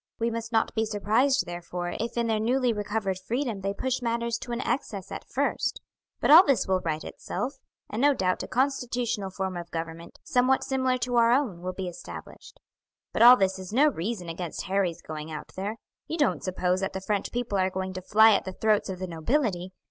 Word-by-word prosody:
"We 230 Hz, +1 st, 0 dB
must 230 Hz, 0 st, -4 dB
not 225 Hz, -1 st, +1 dB
be 220 Hz, -, +1 dB
surprised, 225 Hz, +6 st, +2 dB
therefore, 175 Hz, 0 st, -5 dB
if 230 Hz, +1 st, -3 dB
in 235 Hz, -, +2 dB
their 220 Hz, -1 st, +1 dB
newly 245 Hz, +2 st, +2 dB
recovered 205 Hz, -2 st, -2 dB
freedom 230 Hz, +1 st, -2 dB
they 195 Hz, +1 st, -1 dB
push 260 Hz, +6 st, -2 dB
matters 235 Hz, -1 st, -1 dB
to 240 Hz, -, -7 dB
an 235 Hz, -, -2 dB
excess 205 Hz, -9 st, -3 dB
at -, -, -7 dB
first; -, -, -1 dB, 0.4 s
but -, -, +2 dB
all 330 Hz, +4 st, +11 dB
this 275 Hz, -, +2 dB
will 190 Hz, -1 st, +2 dB
right 160 Hz, -3 st, -3 dB
itself, 270 Hz, +2 st, -5 dB, 0.3 s
and 220 Hz, -, -3 dB
no 285 Hz, 0 st, +5 dB
doubt 185 Hz, -4 st, 0 dB
a -, -, -5 dB
constitutional 245 Hz, -5 st, -1 dB
form 190 Hz, -1 st, -3 dB
of 175 Hz, -1 st, -6 dB
government, 165 Hz, 0 st, -6 dB
somewhat 255 Hz, +1 st, +2 dB
similar 260 Hz, -1 st, +1 dB
to 245 Hz, -1 st, -1 dB
our 230 Hz, 0 st, +5 dB
own, 240 Hz, -10 st, +1 dB
will 185 Hz, +1 st, -4 dB
be 190 Hz, -1 st, -4 dB
established. 175 Hz, -, -10 dB, 0.5 s
But -, -, 0 dB
all 245 Hz, +2 st, +10 dB
this 190 Hz, -2 st, +1 dB
is 185 Hz, 0 st, -8 dB
no 285 Hz, +7 st, +5 dB
reason 195 Hz, -, -4 dB
against 165 Hz, 0 st, -5 dB
Harry's 185 Hz, -3 st, -1 dB
going 155 Hz, 0 st, -6 dB
out 155 Hz, -1 st, -7 dB
there. 205 Hz, +4 st, -3 dB, 0.3 s
You 325 Hz, -, -3 dB
don't 290 Hz, -, +1 dB
suppose 185 Hz, 0 st, 0 dB
that 195 Hz, -, -2 dB
the 190 Hz, -, -3 dB
French 200 Hz, +1 st, -1 dB
people 240 Hz, -5 st, -1 dB
are 185 Hz, 0 st, +2 dB
going 190 Hz, 0 st, -4 dB
to 185 Hz, -, -5 dB
fly 220 Hz, +4 st, +6 dB
at -, -, +2 dB
the 190 Hz, -, -6 dB
throats 215 Hz, 0 st, +1 dB
of 190 Hz, -, -4 dB
the 185 Hz, -, -4 dB
nobility. 185 Hz, -, -1 dB
210 Hz, 210 wpm, -27 LUFS, 185-245 Hz, 0.5 s, all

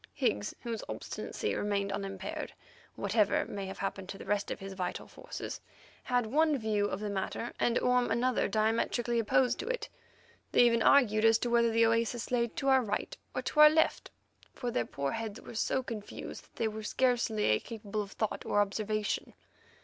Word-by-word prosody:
Higgs, 100 Hz, +1 st, 0 dB
whose 230 Hz, -2 st, -4 dB
obstinacy -, -, -4 dB
remained 200 Hz, -1 st, -1 dB
unimpaired, 195 Hz, -1 st, -4 dB, 0.4 s
whatever 205 Hz, 0 st, +2 dB
may 195 Hz, -1 st, -5 dB
have 190 Hz, -, -7 dB
happened 195 Hz, -1 st, -4 dB
to 195 Hz, -, -6 dB
the -, -, -10 dB
rest 205 Hz, -1 st, 0 dB
of -, -, -4 dB
his 195 Hz, 0 st, -7 dB
vital 180 Hz, -2 st, -4 dB
forces, -, -, -7 dB, 0.4 s
had 245 Hz, -2 st, +1 dB
one 300 Hz, +5 st, +3 dB
view 215 Hz, -3 st, 0 dB
of 190 Hz, -, -3 dB
the 210 Hz, 0 st, -3 dB
matter, 200 Hz, +4 st, -3 dB
and 235 Hz, -, +2 dB
Orme 250 Hz, 0 st, +2 dB
another 245 Hz, +3 st, +1 dB
diametrically 225 Hz, +3 st, +1 dB
opposed 250 Hz, +2 st, +2 dB
to -, -, -4 dB
it. -, -, -3 dB, 0.6 s
They 245 Hz, -, +7 dB
even 230 Hz, -1 st, +3 dB
argued 220 Hz, -4 st, +5 dB
as 225 Hz, 0 st, +6 dB
to 240 Hz, +1 st, -2 dB
whether 235 Hz, -1 st, +4 dB
the 230 Hz, 0 st, +4 dB
oasis 230 Hz, +1 st, 0 dB
lay 235 Hz, -1 st, +2 dB
to 270 Hz, +4 st, -2 dB
our 265 Hz, -1 st, +6 dB
right 210 Hz, -3 st, -3 dB, 0.2 s
or -, -, -2 dB
to 300 Hz, -, -2 dB
our 300 Hz, 0 st, +11 dB
left, 320 Hz, +1 st, +1 dB, 0.5 s
for 245 Hz, -2 st, -3 dB
their 120 Hz, -, 0 dB
poor 140 Hz, -1 st, -2 dB
heads 225 Hz, -2 st, -4 dB
were -, -, -10 dB
so 260 Hz, +3 st, 0 dB
confused 220 Hz, -4 st, -7 dB
that -, -, -30 dB
they 225 Hz, -, 0 dB
were 220 Hz, 0 st, -5 dB
scarcely 220 Hz, -, +2 dB
capable 215 Hz, -2 st, -5 dB
of 200 Hz, -1 st, -7 dB
accurate 220 Hz, -, 0 dB
thought -, -, -11 dB
or 205 Hz, -, +2 dB
observation. 210 Hz, +1 st, -1 dB
220 Hz, 190 wpm, -31 LUFS, 205-240 Hz, 0.6 s, our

